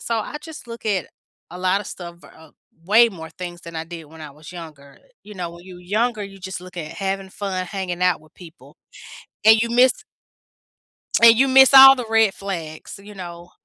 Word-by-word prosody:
So, 230 Hz, -1 st, -2 dB
I 255 Hz, -, -5 dB
just 310 Hz, -4 st, -11 dB
look 230 Hz, -1 st, -9 dB
at 195 Hz, -4 st, -1 dB, 0.4 s
a 175 Hz, -, -9 dB
lot 185 Hz, +2 st, +1 dB
of 205 Hz, -, -9 dB
stuff, 170 Hz, -1 st, -9 dB
uh, 160 Hz, -1 st, -17 dB, 0.3 s
way 225 Hz, +5 st, +5 dB
more 160 Hz, -4 st, -10 dB
things 175 Hz, +1 st, -9 dB
than 170 Hz, -1 st, -9 dB
I 160 Hz, -, -4 dB
did 165 Hz, -1 st, -10 dB
when 160 Hz, +1 st, -15 dB
I 150 Hz, -, -9 dB
was 150 Hz, +2 st, -14 dB
younger. 150 Hz, -5 st, -12 dB, 0.2 s
You 210 Hz, 0 st, -13 dB
know, 175 Hz, -2 st, -5 dB
when 170 Hz, +1 st, -14 dB
you 180 Hz, -1 st, -12 dB
younger, 215 Hz, +5 st, -1 dB
you 195 Hz, 0 st, -12 dB
just 190 Hz, -1 st, -7 dB
look 180 Hz, 0 st, -14 dB
at 155 Hz, 0 st, -6 dB
having 195 Hz, +1 st, -4 dB
fun, 190 Hz, -2 st, -4 dB
hanging 180 Hz, -2 st, -5 dB
out 180 Hz, -3 st, +2 dB
with 155 Hz, -, -22 dB
people, 170 Hz, -3 st, -16 dB, 0.7 s
and 220 Hz, 0 st, +7 dB
you 235 Hz, -, -1 dB
miss 250 Hz, +2 st, +4 dB, 1.3 s
and 230 Hz, -1 st, +8 dB
you 270 Hz, +3 st, +3 dB
miss 265 Hz, +1 st, +6 dB
all 270 Hz, 0 st, +10 dB
the 245 Hz, -2 st, -5 dB
red 225 Hz, -3 st, +3 dB
flags, 170 Hz, -4 st, -7 dB
you 210 Hz, +1 st, -13 dB
know? 175 Hz, -2 st, -10 dB
185 Hz, 205 wpm, -21 LUFS, 170-220 Hz, 1.3 s, all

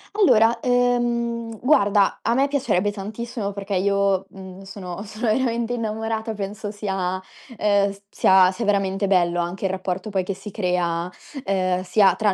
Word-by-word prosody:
Allora, 230 Hz, -, +4 dB
ehm, 240 Hz, -2 st, 0 dB
guarda: 205 Hz, -7 st, +3 dB
a 235 Hz, -, +1 dB
me 270 Hz, +3 st, +2 dB
piacerebbe 230 Hz, -8 st, +1 dB
tantissimo, 210 Hz, +1 st, -5 dB
perché 200 Hz, 0 st, -4 dB
io, 195 Hz, 0 st, +1 dB
mhmm, 190 Hz, 0 st, -11 dB
sono 195 Hz, -2 st, -7 dB
sono 215 Hz, +2 st, -4 dB
veramente 235 Hz, -1 st, 0 dB
innamorata. 225 Hz, -1 st, -2 dB
Penso 205 Hz, +1 st, -5 dB
sia, 190 Hz, -3 st, -2 dB, 0.4 s
ehm, 200 Hz, -1 st, +3 dB
s 200 Hz, -, -18 dB
sia 190 Hz, -2 st, +5 dB
sia 230 Hz, +4 st, -4 dB
veramente 195 Hz, -1 st, +1 dB
bello 175 Hz, -2 st, +2 dB
anche 175 Hz, +3 st, -3 dB
il 190 Hz, -, +1 dB
rapporto, 190 Hz, +2 st, -3 dB
poi, 195 Hz, -2 st, 0 dB
che 195 Hz, -, -3 dB
si 195 Hz, +2 st, -9 dB
crea, 180 Hz, -3 st, -1 dB, 0.4 s
ehm, 185 Hz, -1 st, 0 dB
sia 190 Hz, +1 st, +4 dB
tra 205 Hz, 0 st, +2 dB
200 Hz, 155 wpm, -23 LUFS, 190-225 Hz, 0.4 s, sia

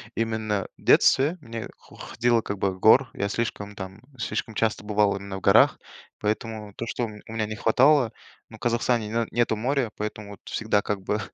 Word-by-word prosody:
именно 110 Hz, -3 st, -1 dB
в -, -, -21 dB
детстве 145 Hz, +7 st, +4 dB
мне 115 Hz, -4 st, -6 dB
хо -, -, -18 dB
ходил, 120 Hz, -1 st, +1 dB
как 100 Hz, -1 st, -4 dB
бы, 95 Hz, -, +1 dB
в 95 Hz, -, -10 dB
горы. 125 Hz, +7 st, +6 dB
Я 100 Hz, -, -2 dB
слишком 105 Hz, -2 st, -3 dB
там, 95 Hz, +1 st, -8 dB, 0.2 s
слишком 115 Hz, -1 st, -3 dB
часто 110 Hz, -1 st, 0 dB
бывал 105 Hz, -1 st, +2 dB
именно 100 Hz, 0 st, -6 dB
в -, -, -9 dB
горах, -, -, +5 dB, 0.4 s
поэтому 105 Hz, -1 st, -3 dB
то, 115 Hz, -, -4 dB
что 120 Hz, -, -2 dB
у -, -, -5 dB
ме 105 Hz, -1 st, -11 dB
у 110 Hz, -, -8 dB
меня 110 Hz, -1 st, -1 dB
не 110 Hz, -, -5 dB
хватало, 125 Hz, +3 st, +4 dB, 0.4 s
ну, 110 Hz, -, -12 dB
в -, -, -26 dB
Казахстане 120 Hz, -1 st, 0 dB
на 115 Hz, 0 st, 0 dB
нету 120 Hz, -1 st, +1 dB
моря, 125 Hz, +1 st, 0 dB
поэтому 105 Hz, -1 st, -5 dB
вот 100 Hz, -, -11 dB
всегда 110 Hz, -2 st, 0 dB
как 100 Hz, -1 st, -3 dB
бы, 105 Hz, +3 st, -1 dB
110 Hz, 205 wpm, -25 LUFS, 105-115 Hz, 0.4 s, горы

